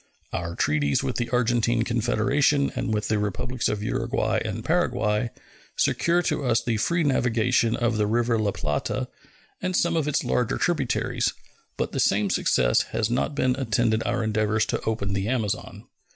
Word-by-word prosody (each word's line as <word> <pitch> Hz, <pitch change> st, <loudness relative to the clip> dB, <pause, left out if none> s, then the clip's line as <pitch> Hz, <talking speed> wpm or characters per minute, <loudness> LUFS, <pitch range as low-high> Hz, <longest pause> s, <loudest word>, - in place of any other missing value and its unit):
Our 85 Hz, 0 st, -3 dB
treaties 75 Hz, -3 st, +1 dB
with -, -, -2 dB
the 120 Hz, -1 st, -2 dB
Argentine 120 Hz, -1 st, +2 dB
Confederation 130 Hz, +5 st, +1 dB
and 130 Hz, -, -2 dB
with 105 Hz, -1 st, -1 dB
the 110 Hz, -, +1 dB
Republics 110 Hz, +5 st, -2 dB
of 105 Hz, -1 st, -2 dB
Uruguay -, -, 0 dB
and -, -, -5 dB
Paraguay 105 Hz, +2 st, +1 dB, 0.5 s
secure 175 Hz, +1 st, +2 dB
to 150 Hz, -, -1 dB
us 115 Hz, -3 st, +2 dB
the 115 Hz, -2 st, 0 dB
free 170 Hz, +9 st, +1 dB
navigation 125 Hz, -4 st, +2 dB
of 120 Hz, -2 st, 0 dB
the 105 Hz, -1 st, +1 dB
river 115 Hz, +1 st, +1 dB
La 105 Hz, -1 st, +1 dB
Plata 75 Hz, -6 st, -2 dB, 0.5 s
and 185 Hz, 0 st, -1 dB
some 170 Hz, -1 st, +2 dB
of 155 Hz, -3 st, 0 dB
its 150 Hz, -, 0 dB
larger 125 Hz, -2 st, 0 dB
tributaries, 160 Hz, -8 st, 0 dB, 0.4 s
but -, -, -2 dB
the -, -, -3 dB
same 100 Hz, -1 st, +2 dB
success -, -, +2 dB, 0.2 s
has 115 Hz, 0 st, 0 dB
not 135 Hz, +4 st, -1 dB
attended 120 Hz, -4 st, +1 dB
our 120 Hz, 0 st, -1 dB
endeavors 110 Hz, 0 st, +1 dB
to -, -, -2 dB
open 105 Hz, -3 st, -1 dB
the 95 Hz, +1 st, -1 dB
Amazon. 110 Hz, -5 st, -3 dB
115 Hz, 165 wpm, -25 LUFS, 105-125 Hz, 0.5 s, Argentine